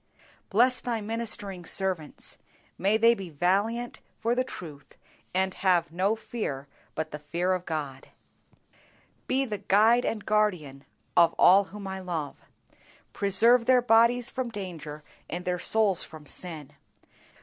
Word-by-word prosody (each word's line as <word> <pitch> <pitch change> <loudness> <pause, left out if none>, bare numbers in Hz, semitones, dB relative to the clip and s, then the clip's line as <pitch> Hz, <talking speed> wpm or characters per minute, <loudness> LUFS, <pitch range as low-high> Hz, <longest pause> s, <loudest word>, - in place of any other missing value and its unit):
Bless 250 +5 +3
Thy 235 -2 -2
ministering 210 -4 -4
servants; 180 -3 -3 0.4
may 200 +3 +2
they 230 +1 +6
be 195 -5 -7
valiant 200 +10 0 0.2
for 230 +2 +1
the 255 +1 +1
truth, 150 - -10 0.3
and 190 0 0
have 180 -4 +2
no 190 +6 +1
fear 145 - -5 0.3
but 155 0 -3
the 150 - -6
fear 170 +5 -1
of 180 -1 -4
God. 145 -5 -4 1.2
Be 270 +1 +1
the 210 -5 -4
Guide 220 +5 +4
and 215 -2 -3
Guardian 180 -11 0 0.3
of 170 -1 +5
all 195 +2 +6
whom 200 +1 -9
I 190 0 -4
love. 165 -6 -4 0.8
Preserve 230 +5 +3
their 255 -1 +5
bodies 235 +1 +4
from 255 -2 -3
danger 170 -8 -7 0.3
and 175 +2 -5
their 180 -1 -1
souls 210 -4 +1
from 155 -1 -11
sin. 155 -4 -6
190 Hz, 140 wpm, -27 LUFS, 170-225 Hz, 1.2 s, they